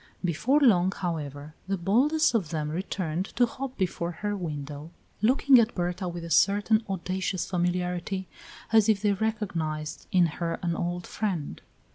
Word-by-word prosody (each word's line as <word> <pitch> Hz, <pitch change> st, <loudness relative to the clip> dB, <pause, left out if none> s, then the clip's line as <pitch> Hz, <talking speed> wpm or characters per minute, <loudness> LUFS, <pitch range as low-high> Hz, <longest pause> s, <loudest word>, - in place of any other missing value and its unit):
Before 220 Hz, -, +2 dB
long, 190 Hz, -9 st, +4 dB
however, 150 Hz, -6 st, -4 dB
the 195 Hz, 0 st, 0 dB
boldest 255 Hz, -, +3 dB
of 200 Hz, -9 st, 0 dB
them 150 Hz, -2 st, -2 dB
returned 180 Hz, 0 st, -2 dB
to 245 Hz, -, +5 dB
hop 260 Hz, +2 st, -6 dB
before 175 Hz, -2 st, -1 dB
her 205 Hz, +4 st, -3 dB
window, 150 Hz, -4 st, -5 dB, 0.3 s
looking 260 Hz, +3 st, +5 dB
at 230 Hz, 0 st, +1 dB
Berta 180 Hz, +1 st, -2 dB
with 175 Hz, -1 st, -5 dB
a 170 Hz, -, -7 dB
certain 205 Hz, +6 st, +4 dB
audacious 185 Hz, -1 st, -2 dB
familiarity 180 Hz, +1 st, -1 dB, 0.5 s
as 220 Hz, -1 st, +5 dB
if 215 Hz, -2 st, +4 dB
they 205 Hz, -1 st, +3 dB
recognized 175 Hz, -8 st, -3 dB
in 180 Hz, -2 st, +5 dB
her 165 Hz, +1 st, -2 dB
an 170 Hz, -1 st, 0 dB
old 175 Hz, +1 st, -3 dB
friend. 180 Hz, -, -3 dB
180 Hz, 150 wpm, -27 LUFS, 170-210 Hz, 0.5 s, to